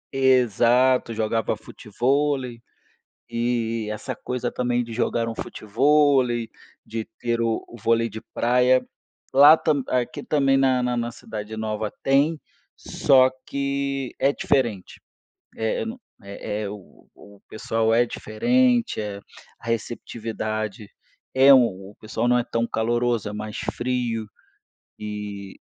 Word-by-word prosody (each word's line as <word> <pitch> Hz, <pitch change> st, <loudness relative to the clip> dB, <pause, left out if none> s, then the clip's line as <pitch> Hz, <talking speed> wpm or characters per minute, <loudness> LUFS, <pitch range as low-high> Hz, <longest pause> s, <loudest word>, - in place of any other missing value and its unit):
Exato, 125 Hz, -1 st, +3 dB
jogava 110 Hz, 0 st, -1 dB
futevôlei. 125 Hz, +3 st, -1 dB, 0.7 s
E 115 Hz, -2 st, -1 dB
essa 110 Hz, -, -5 dB
coisa 125 Hz, -1 st, -3 dB
também 120 Hz, -1 st, 0 dB
de 115 Hz, -1 st, -8 dB
jogar 115 Hz, 0 st, 0 dB
um 115 Hz, -, -5 dB
futevôlei, 130 Hz, 0 st, +2 dB, 0.3 s
de 110 Hz, 0 st, -5 dB, 0.2 s
ter 120 Hz, -1 st, -1 dB
o 115 Hz, -1 st, 0 dB
o 120 Hz, -, -12 dB
vôlei 115 Hz, +2 st, +2 dB
de 110 Hz, +1 st, -8 dB
praia. 125 Hz, +1 st, +3 dB, 0.5 s
Lá, 145 Hz, +3 st, +8 dB
tam 145 Hz, -5 st, 0 dB
aqui 125 Hz, -1 st, -1 dB
também 135 Hz, -3 st, +2 dB
na 130 Hz, -2 st, +3 dB
na 125 Hz, 0 st, 0 dB
na 120 Hz, 0 st, -2 dB
cidade 110 Hz, -2 st, -7 dB
nova 110 Hz, -1 st, -3 dB
tem, 145 Hz, +4 st, +2 dB, 0.4 s
só 130 Hz, -1 st, +3 dB, 0.2 s
que 140 Hz, -1 st, -2 dB
é 140 Hz, +1 st, +3 dB
diferente. 120 Hz, -12 st, -1 dB, 0.6 s
É 110 Hz, -, -1 dB
no 235 Hz, +3 st, -7 dB, 0.2 s
é 100 Hz, +1 st, -5 dB
é -, -, -3 dB
o 105 Hz, -2 st, -12 dB
o 100 Hz, -1 st, -17 dB
pessoal 110 Hz, +1 st, 0 dB
é 120 Hz, +1 st, +4 dB
diferente, 245 Hz, -, +1 dB
a 100 Hz, -1 st, -5 dB, 0.4 s
a -, -, -13 dB
receptividade 110 Hz, -2 st, -4 dB, 0.4 s
é 135 Hz, +1 st, +7 dB
um 125 Hz, -2 st, +6 dB, 0.2 s
o -, -, -18 dB
pessoal 110 Hz, +2 st, -2 dB
não 125 Hz, 0 st, +4 dB
é 120 Hz, -, +2 dB
tão 115 Hz, -1 st, -1 dB
caloroso, 120 Hz, -1 st, 0 dB
é -, -, -6 dB
mais 105 Hz, 0 st, -6 dB
frio. 120 Hz, -3 st, -2 dB, 0.7 s
E 105 Hz, -2 st, -7 dB
120 Hz, 130 wpm, -24 LUFS, 110-130 Hz, 0.7 s, Lá